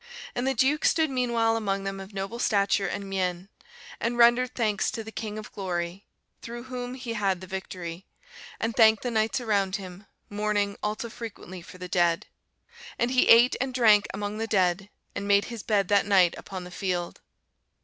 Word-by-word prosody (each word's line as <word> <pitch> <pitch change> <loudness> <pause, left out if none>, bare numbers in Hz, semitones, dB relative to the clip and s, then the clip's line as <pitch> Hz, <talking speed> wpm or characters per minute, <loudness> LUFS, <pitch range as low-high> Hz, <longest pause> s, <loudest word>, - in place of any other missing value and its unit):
And 245 +2 -2
the 270 - +1
Duke 270 +6 +2
stood 320 -3 +3
meanwhile 235 -3 +1
among 200 -3 -1
them 195 0 -4
of 195 +1 -9
noble 195 +4 -5
stature 200 -3 +2
and 200 +2 -4
mien; 185 -1 -2 0.5
and 240 +1 -1
rendered 240 +1 +4
thanks 215 -4 +1
to 225 - -5
the 220 - -9
King 215 -1 -5
of 215 - -8
Glory, 180 0 -4 0.3
through 235 +1 -7
whom 250 -1 -6
he 250 -3 -5
had 195 -4 0
the 185 - -9
victory; 185 -2 -7 0.5
and 225 0 -2
thanked 220 -2 +5
the 245 - -2
knights 220 +1 +1
around 200 -5 0
him, 195 0 -8 0.2
mourning 205 -1 -1
also 215 +2 -2
frequently 215 -6 -9
for 180 - -13
the 180 0 -7
dead. 175 +1 +1 0.7
And 240 +1 0
he 255 - +3
ate 235 +2 +7
and 260 -1 -2
drank 215 -4 +5
among 205 +2 -4
the 225 - -2
dead, 190 -1 +1 0.2
and 200 - -4
made 200 0 +4
his 230 - -6
bed 205 -3 +1
that 200 -1 +3
night 185 -4 +5
upon 185 -2 -7
the 180 - -10
field. 175 -2 -3
205 Hz, 185 wpm, -27 LUFS, 190-230 Hz, 0.7 s, ate